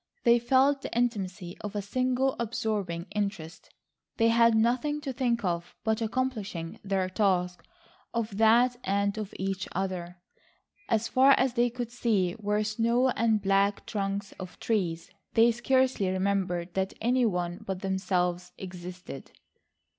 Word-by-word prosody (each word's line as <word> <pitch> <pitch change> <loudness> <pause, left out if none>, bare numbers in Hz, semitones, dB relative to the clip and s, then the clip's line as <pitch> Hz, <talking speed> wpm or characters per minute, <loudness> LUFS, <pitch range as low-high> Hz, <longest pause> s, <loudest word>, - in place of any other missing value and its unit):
They 235 0 +5
felt 265 +3 +3
the - - -6
intimacy 195 -7 -2
of 210 0 -6
a 205 - -1
single 255 +4 0
absorbing 215 -7 -2
interest. 200 -6 -4 0.5
They 230 -1 +4
had 230 0 +5
nothing 250 +7 +1
to 275 -3 -4
think 240 -2 0
of 170 -1 -2
but 220 0 0
accomplishing 215 -8 -3
their 195 -2 0
task,—of 210 - -2
that 235 +3 +4
and 200 +1 0
of 210 -2 -5
each 190 0 -3
other. 180 -2 -3 0.7
As 225 0 +1
far 265 +3 +6
as 260 -1 +2
they 240 0 +2
could 240 -1 -5
see 210 -7 0
were 210 0 0
snow 235 +4 +2
and 220 -4 +1
black 200 +1 +2
trunks 200 -2 -3
of 185 -1 -9
trees. 175 -8 -1 0.2
They 230 +1 +6
scarcely 250 -3 +1
remembered 185 -2 -1
that 190 0 -1
any 245 +1 +2
one 180 0 -3
but 190 -3 -4
themselves 180 -2 -1
existed. 180 -5 -8
210 Hz, 140 wpm, -28 LUFS, 185-240 Hz, 0.7 s, far